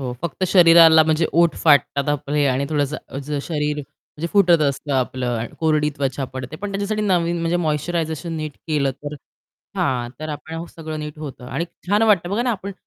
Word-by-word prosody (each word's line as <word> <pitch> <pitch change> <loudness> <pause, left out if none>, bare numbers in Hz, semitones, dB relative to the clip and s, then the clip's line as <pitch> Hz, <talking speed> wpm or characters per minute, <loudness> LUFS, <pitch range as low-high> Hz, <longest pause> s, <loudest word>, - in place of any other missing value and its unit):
हो. 125 -2 -3
फक्त 170 +2 -2
शरीराला 165 -3 +7
म्हणजे 160 +1 +1
ओठ 170 -1 +3
फाटतात 140 -2 +3
आपले 145 0 0
आणि 130 +1 +1
थोडंसं 150 -1 0 0.2
अज 140 +2 -7
शरीर 150 -2 -2
म्हणजे 150 +2 -8
फुटत 175 -5 +5
असतं 140 +1 -1
आपलं 125 -3 -1
कोरडी 155 -2 +2
त्वचा 135 -1 -2
पडते, 130 +3 -6
पण 205 +3 -5
त्याच्यासाठी 205 +2 -2
नवीन 175 -3 +1
म्हणजे 170 +1 0
मॉइश्चरायझेशन 160 0 -2
नीट 155 -1 -4
केलं, 145 -4 +1
तर 145 +2 -8 0.6
हां. 120 -2 0
तर 155 - -5
आपण 160 +2 -6
सगळं 160 -1 -6
नीट 150 0 -7
होतं 140 -4 -8
आणि 135 +6 -2 0.2
छान 205 +3 +3
वाटतं 195 -5 +3
बघा 215 +4 0
ना 245 - 0
आपण 200 -2 -4
155 Hz, 175 wpm, -21 LUFS, 140-170 Hz, 0.6 s, शरीराला